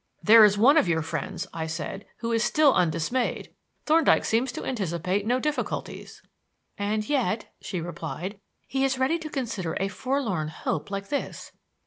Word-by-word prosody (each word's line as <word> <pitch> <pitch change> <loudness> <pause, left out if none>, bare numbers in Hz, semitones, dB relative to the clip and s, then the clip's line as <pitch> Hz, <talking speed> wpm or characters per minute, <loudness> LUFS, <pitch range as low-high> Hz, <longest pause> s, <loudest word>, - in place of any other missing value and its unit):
"There 220 +1 +8
is 205 -1 +5
one 270 +9 +6
of 300 - +4
your 160 -2 +1
friends," 165 +3 -4
I 160 -1 -3
said, 165 +5 -5
"who 230 0 -2
is 230 0 +2
still 300 -3 +4
undismayed. 170 +9 0 0.3
Thorndyke 320 +2 +4
seems 240 +3 +1
to - - -6
anticipate 190 -3 -2
no 250 +2 +2
difficulties." 300 +2 -4 0.5
"And 210 +1 -2
yet," 250 -6 -1
she 180 -4 -4
replied, 175 +4 -6 0.3
"he 265 +2 -1
is 270 -1 +1
ready 265 +6 +1
to 315 -1 -6
consider 230 - -3
a 195 - 0
forlorn 225 - -2
hope 155 +1 -3
like 195 0 -5
this. 285 - -4
215 Hz, 160 wpm, -26 LUFS, 175-260 Hz, 0.5 s, There